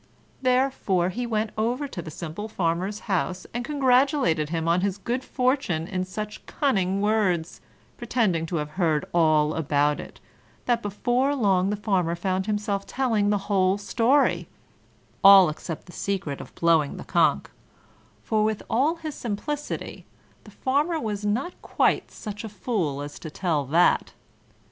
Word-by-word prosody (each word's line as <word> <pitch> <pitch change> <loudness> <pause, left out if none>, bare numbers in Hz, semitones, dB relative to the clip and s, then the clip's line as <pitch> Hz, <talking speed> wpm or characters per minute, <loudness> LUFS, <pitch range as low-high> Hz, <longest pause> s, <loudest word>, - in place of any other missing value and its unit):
Therefore 250 -9 +1
he 240 +6 -3
went 220 -1 -1
over 245 +6 -1
to 195 -10 -6
the 160 - -8
simple 170 +6 -6
Farmer's 185 +1 -2
house, 185 -2 -2
and 240 +1 -2
congratulated 260 - +2
him 165 0 -2
on 170 +2 +3
his 200 0 -1
good 245 +6 -3
fortune 250 - 0
in 185 -2 -2
such 210 +3 -6
cunning 195 -9 0
words, 205 -6 0 0.4
pretending 215 -9 0
to 175 - -3
have 150 -2 -3
heard 155 -3 +2
all 155 -2 +3
about 150 -1 +1
it, - - -10 0.5
that 240 -2 +1
before 245 +7 0
long 195 -6 +2
the 210 - 0
Farmer 190 -5 0
found 185 +2 -2
himself 205 -2 -2
telling 220 -3 +1
the 205 - +2
whole 190 -1 +2
story 235 +7 +2 0.8
all 195 -3 +9
except 155 +1 -6
the 175 - -13
secret 175 -8 -3
of - - -13
blowing 165 -4 +2
the - - -7
conch, - - +2 0.8
for, 215 -1 +1
with 215 -1 -1
all 280 +8 +2
his 320 -3 -6
simplicity, 280 +6 -5 0.4
the - - -12
Farmer 295 +5 0
was 210 -5 -3
not 255 - -1
quite - - +1
such 210 0 -7
a 220 - -5
fool 185 - -2
as 145 0 -8
to 160 - -7
tell 155 -3 -1
that. 165 +6 +3
200 Hz, 155 wpm, -25 LUFS, 170-240 Hz, 0.8 s, all